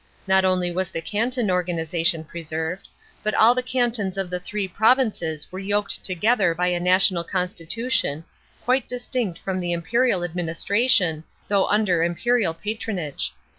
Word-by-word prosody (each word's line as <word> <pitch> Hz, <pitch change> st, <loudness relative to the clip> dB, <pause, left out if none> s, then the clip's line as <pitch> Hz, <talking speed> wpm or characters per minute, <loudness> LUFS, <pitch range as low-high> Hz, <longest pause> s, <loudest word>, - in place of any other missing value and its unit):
Not 190 Hz, 0 st, +4 dB
only 185 Hz, -1 st, +1 dB
was 185 Hz, +1 st, -2 dB
the -, -, -4 dB
canton 225 Hz, +4 st, -1 dB
organisation 170 Hz, -2 st, 0 dB
preserved, 160 Hz, +2 st, -5 dB, 0.3 s
but 215 Hz, -, -1 dB
all 230 Hz, +2 st, +6 dB
the 255 Hz, -, -1 dB
cantons 240 Hz, -6 st, -1 dB
of 190 Hz, -2 st, -3 dB
the 180 Hz, -, -2 dB
three 200 Hz, +2 st, -3 dB
provinces 205 Hz, -, +1 dB
were 185 Hz, -, -6 dB
yoked 205 Hz, +1 st, 0 dB
together 195 Hz, -1 st, +2 dB
by 180 Hz, +1 st, +1 dB
a 175 Hz, -1 st, 0 dB
national 180 Hz, 0 st, +3 dB
constitution, 180 Hz, -, -1 dB, 0.4 s
quite 255 Hz, +2 st, +1 dB
distinct 245 Hz, -6 st, -2 dB
from 190 Hz, 0 st, -3 dB
the 175 Hz, -1 st, -1 dB
imperial 185 Hz, +3 st, +1 dB
administration, 175 Hz, +1 st, +1 dB, 0.3 s
though 200 Hz, -2 st, +2 dB
under 205 Hz, -5 st, +2 dB
imperial 175 Hz, +2 st, +1 dB
patronage. 200 Hz, -6 st, -3 dB
185 Hz, 140 wpm, -23 LUFS, 170-220 Hz, 0.4 s, all